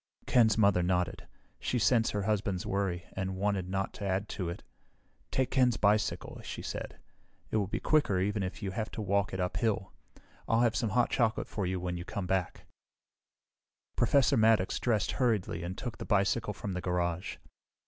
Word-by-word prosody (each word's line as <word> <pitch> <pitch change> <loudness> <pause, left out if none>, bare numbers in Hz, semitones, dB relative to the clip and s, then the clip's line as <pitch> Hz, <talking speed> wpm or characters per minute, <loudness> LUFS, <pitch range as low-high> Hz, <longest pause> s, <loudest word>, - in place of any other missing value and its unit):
Ken's 110 -4 +4
mother 100 -4 +4
nodded. 90 0 -1 0.3
She 125 - -1
sensed 115 +1 +3
her 105 -1 -1
husband's 100 -3 -1
worry, 95 -3 -1
and 95 0 -3
wanted 100 -2 0
not 95 +1 -2
to - - -8
add 100 +1 0
to 90 -4 -3
it. 85 - -6 0.7
"Take 130 -1 0
Ken's 125 -3 +3
bicycle," 105 +1 +1
she - - -6
said. - - -5 0.5
"It - - +2
will 100 -3 +1
be - - -2
quicker, 145 -12 +2
even 100 +2 0
if 95 +3 -4
you 95 - -2
have 110 +2 -3
to - - -4
walk 100 0 +1
it 95 - -4
uphill. 95 +1 -1 0.5
I'll 115 +1 +3
have 120 -2 +3
some 110 0 0
hot 120 +4 +2
chocolate 115 -2 +1
for 100 -4 -2
you 95 0 -1
when 90 0 -3
you 85 - -5
come 95 +1 -4
back." 95 -1 -1 1.3
Professor 140 +3 +4
Maddox 110 -4 +3
dressed 110 -4 +1
hurriedly 110 -9 0
and 90 +2 -5
took 120 -3 -5
the - - -5
bicycle 105 +1 +1
from 100 -2 -4
the 90 - -3
garage. 90 -1 -1
100 Hz, 180 wpm, -31 LUFS, 95-110 Hz, 1.3 s, Ken's